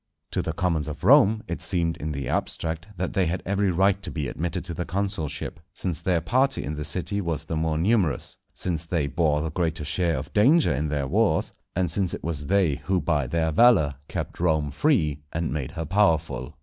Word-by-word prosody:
To - - 0
the - - -2
commons 85 -5 0
of 75 +1 -7
Rome 110 -2 +6
it 85 - -4
seemed, 85 -3 0
in 75 +1 -4
the 70 -1 -4
abstract, 80 +2 -2
that 90 +1 -2
they 95 -4 +2
had 90 +3 -2
every 100 +1 +1
right 95 +2 +2
to - - -5
be 75 -3 -3
admitted 85 +5 -3
to 85 - -5
the 90 - -3
consulship, 95 -4 -3 0.2
since 90 -3 -2
their 90 -3 +1
party 130 +10 +1
in 75 - -3
the 75 - -4
city 95 +6 -3
was 85 -4 -2
the 80 - -4
more 80 0 0
numerous, 90 -3 +1 0.2
since 85 -3 -3
they 85 -3 -1
bore 75 0 +1
the 80 - -3
greater 80 -2 -1
share 85 +1 0
of 70 - -6
danger 130 - +5
in 75 +4 -1
their 75 -2 -1
wars, - - +2 0.2
and 90 -2 0
since 95 0 -1
it - - -10
was 75 -3 -3
they 95 -7 +2
who 95 -1 +2
by 75 -7 0
their 80 +3 0
valour 80 -7 +5
kept - - -5
Rome 80 -4 +1
free 75 - +1
and 80 -1 -1
made 75 0 -4
her 80 -2 -4
powerful. 80 -6 +1
85 Hz, 210 wpm, -25 LUFS, 75-95 Hz, 0.2 s, Rome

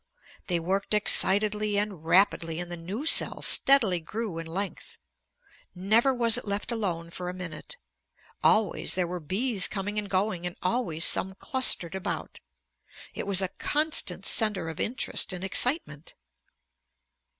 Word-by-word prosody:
They 175 -2 0
worked 195 +5 -2
excitedly 210 0 +1
and 200 -6 -3
rapidly, 165 -1 +1
and 175 0 -7
the - - -4
new 190 - -7
cell - - +5
steadily 230 -10 +4
grew 195 +1 -6
in 165 - -8
length. 190 +4 -6 0.8
Never 215 +8 +2
was 235 -3 +2
it - - -14
left 200 +4 -3
alone 175 -7 -4
for 180 +1 -6
a 180 - -7
minute. 180 - -8 0.7
Always 215 -1 +2
there 180 -1 0
were 180 +1 -6
bees 195 - 0
coming 205 +1 -4
and 205 -1 -7
going 185 -2 -2
and 175 - -8
always 180 -5 -1
some 190 +1 0
clustered 195 -7 +2
about. 190 +1 -6 0.7
It - - -7
was 195 -1 +3
a - - 0
constant 305 +1 0
center 210 -7 +2
of 160 - -9
interest 230 -4 -1
and 180 0 -7
excitement. 190 - 0
195 Hz, 145 wpm, -26 LUFS, 175-215 Hz, 0.8 s, cell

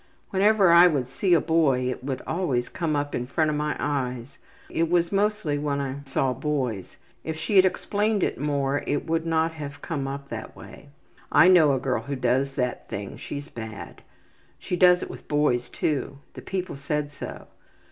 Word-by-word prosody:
Whenever 200 -1 +4
I 170 +1 +8
would 140 -7 0
see 175 +7 +2
a - - +5
boy 145 -6 +2
it 125 - -7
would 135 -1 -4
always 150 -8 -1
come 160 -3 -2
up 145 0 -2
in 125 - -2
front 155 +2 +1
of - - -1
my 150 0 -1
eyes. 130 -3 -3 0.3
It 165 0 -1
was 170 -1 +2
mostly 200 -7 0
when 145 -1 -1
I 135 -1 -3
saw 135 -1 0
boys. 125 -8 -3 0.3
If 160 0 -4
she 200 +6 -2
had 190 -1 +8
explained 205 +2 0
it - - -1
more 140 -1 0
it 145 - -1
would 165 0 -1
not 165 0 +1
have 145 -3 -8
come 145 -5 -3
up 140 0 -6
that 110 -1 -7
way. 145 - -13 0.4
I 180 - +7
know 160 -6 +6
a 135 - 0
girl 125 -3 -1
who 140 +5 -4
does 130 +2 0
that 125 -2 -2
thing. 100 0 -5
She's 145 0 -6
bad. 110 -6 -8 0.6
She 180 - -3
does 180 0 +5
it - - -7
with - - -12
boys 145 -5 +1
too. 140 -2 -2 0.2
The - - -9
people 185 -6 -4
said 145 +1 -2
so. 145 - -8
145 Hz, 190 wpm, -25 LUFS, 135-165 Hz, 0.6 s, I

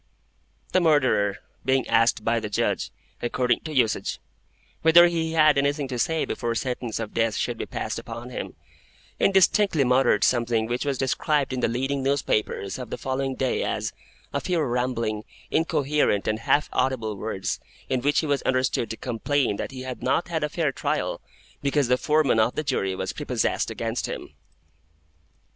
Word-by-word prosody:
The 185 - +3
Murderer, 130 - +3 0.3
being 130 0 +1
asked 115 -1 +3
by 115 0 +2
the 105 -1 -5
Judge, - - 0 0.3
according 120 0 +1
to 155 - -7
usage, 125 -6 +1 0.6
whether 165 +2 +8
he 165 -2 0
had 155 -3 +5
anything 140 0 0
to 125 -2 -3
say 160 +6 +1
before 115 -1 -2
sentence 125 -2 -3
of 110 -2 -5
Death 115 -2 +1
should - - -1
be - - -3
passed - - -3
upon 115 +2 -8
him, - - -5 0.6
indistinctly 195 -4 +4
muttered 125 +1 +3
something 115 -2 +2
which 120 +4 -2
was 140 -2 0
described 135 +1 0
in 130 - -2
the - - +2
leading 135 +4 -1
newspapers 130 -6 -1
of 125 -3 -6
the - - -4
following 135 0 -2
day 130 -1 0
as - - -2 0.4
"a - - -1
few 180 -2 0
rambling, 120 -4 -1 0.3
incoherent, 150 -9 +1
and 110 0 0
half 145 +6 +2
audible 115 -5 0
words, 95 -1 -3 0.3
in 130 -2 0
which 145 +3 +2
he - - -3
was 145 -2 +1
understood 130 -2 0
to 110 - -5
complain 125 -1 0
that - - -4
he 130 -1 -8
had 130 -1 -6
not 160 +7 0
had 160 -2 -1
a 150 - 0
fair 155 -2 0
trial, - - -2 0.4
because 140 -2 +1
the 125 - +5
Foreman 150 -5 +2
of 110 +2 +2
the 155 - -1
Jury 95 -10 -1
was 95 0 -3
prepossessed - - -1
against - - -3
him." - - -7
130 Hz, 170 wpm, -25 LUFS, 115-145 Hz, 0.6 s, whether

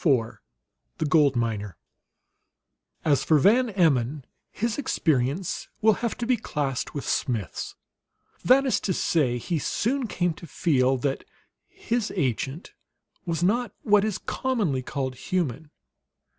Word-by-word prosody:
IV 125 -8 +1 0.6
THE 155 - -1
GOLD 145 -2 +4
MINER 110 -4 -2 1.3
As 145 -4 +3
for 155 - +4
Van 230 - +4
Emmon, 150 - +1 0.3
his 230 +4 -2
experience 160 - 0
will 220 0 +5
have 235 -2 -2
to 240 - -3
be 250 0 +2
classed 145 - -3
with 140 - -4
Smith's. 110 -8 -2 0.7
That 270 +2 +5
is 260 - +2
to 190 - -1
say, 140 -8 +1
he 160 +7 -2
soon 245 - -1
came 175 -4 0
to 170 - -12
feel 135 -6 +2
that 135 +2 -2 0.4
his 230 -2 -2
agent 135 - -2 0.5
was 170 0 -1
not 225 +3 +1
what 210 -1 +4
is 215 -3 -1
commonly 210 - -1
called 130 0 -3
human. 155 -1 -2
160 Hz, 130 wpm, -26 LUFS, 130-210 Hz, 1.3 s, will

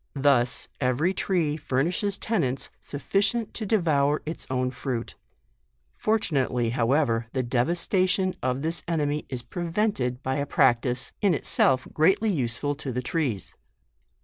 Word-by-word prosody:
Thus 135 -3 +2
every 140 +8 +1
tree 165 -7 0
furnishes 170 +9 0
tenants 150 - -1
sufficient 200 +9 -1
to 220 - -4
devour 155 -8 +2
its 160 +2 -4
own 125 -1 0
fruit. 125 -2 -4 0.8
Fortunate 175 - +1
ly, 120 -2 0
however, 120 -1 +1
the 130 - 0
devastation 180 - +1
of 130 +2 -1
this 165 +2 0
enemy 150 -3 -1
is 125 -3 -3
prevented 165 - -1
by 130 +1 -1
a 140 0 -1
practice, 125 -2 +2
in 195 -5 +3
itself 130 -2 +2
greatly 190 +7 +3
use 120 -9 -1
ful 145 +2 -1
to 135 - -3
the 125 +1 -3
trees. 130 - -2
145 Hz, 135 wpm, -26 LUFS, 125-175 Hz, 0.8 s, in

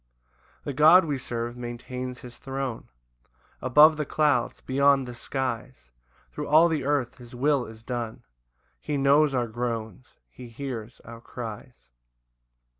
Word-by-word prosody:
3 - - -4
The - - -7
God 160 +6 +7
we 145 -4 -2
serve 120 -1 -4
maintains 125 +1 -6
his 120 -1 -12
throne 135 -3 -5 0.7
Above 150 +5 +6
the 150 - -1
clouds, 145 -5 +1
beyond 135 0 +2
the 125 - -7
skies, 125 - -5 0.4
Thro' - - -5
all 155 +3 +6
the 160 -2 -1
earth 140 -4 0
his 120 0 -12
will 140 0 +1
is 110 0 -13
done, 120 -2 -5 0.6
He 150 -1 -3
knows 140 +1 +4
our 125 -1 +1
groans, 115 0 -5 0.2
he 125 - -11
hears 120 -2 -7
our 115 0 -10
cries. 115 - -9
125 Hz, 140 wpm, -26 LUFS, 120-140 Hz, 0.7 s, God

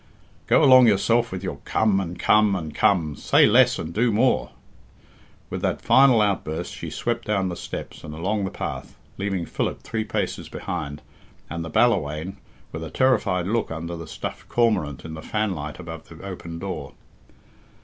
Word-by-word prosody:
"Go - - +5
along 130 -3 +8
yourself 115 +3 +2
with 95 0 -5
your 90 -7 -4
'come' 100 +7 +1
and 90 -2 -4
'come' 105 0 +4
and 80 -5 -5
'come.' 80 -3 +2
Say - - +4
less - - +5
and 80 - -5
do 115 +4 +2
more." 120 +5 +2 1.0
With - - -3
that - - 0
final 130 -4 +5
outburst 95 -6 -2
she - - -6
swept - - -2
down 95 -3 +1
the 90 - -4
steps - - -7
and 75 - -7
along 95 +7 -2
the 95 - -1
path, - - -6 0.2
leaving 95 -3 -1
Philip - - -3
three 110 -1 -2
paces - - -3
behind, 75 -1 -5 0.5
and 85 -1 -3
the 80 - -6
Ballawhaine 85 -5 +1 0.3
with 80 - -6
a 80 - -6
terrified 100 - +2
look 110 +3 0
under 85 +1 -5
the 80 -1 -8
stuffed - - -7
cormorant 95 - +1
in 80 - -7
the 80 - -7
fanlight 90 -9 -3
above 80 -2 -9
the 80 - -12
open 85 -3 -7
door. 95 +1 -6
95 Hz, 170 wpm, -24 LUFS, 80-110 Hz, 1.0 s, along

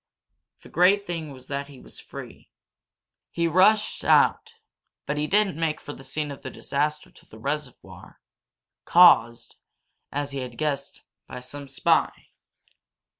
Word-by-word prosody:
The - - -15
great 195 +4 +3
thing 165 -4 -5
was 130 -2 -13
that 140 0 -4
he 140 -2 -14
was - - -11
free. - - -11 0.8
He 170 0 -1
rushed 200 +6 +3
out, 455 0 +3 0.5
but 150 - -2
he 150 +1 -1
didn't 195 -3 +2
make 160 -2 -1
for 145 - -8
the 135 - -12
scene 145 +2 -4
of 140 - -9
the - - -6
disaster 150 +2 -3
to - - -21
the 110 - -13
reservoir, 140 +2 -6 0.6
caused, 120 -10 +5 0.5
as 145 0 -3
he 140 - -4
had 125 -2 -7
guessed, 145 -2 -3 0.3
by 125 - -8
some 140 +3 -9
spy. 135 - 0
150 Hz, 145 wpm, -25 LUFS, 140-170 Hz, 0.8 s, caused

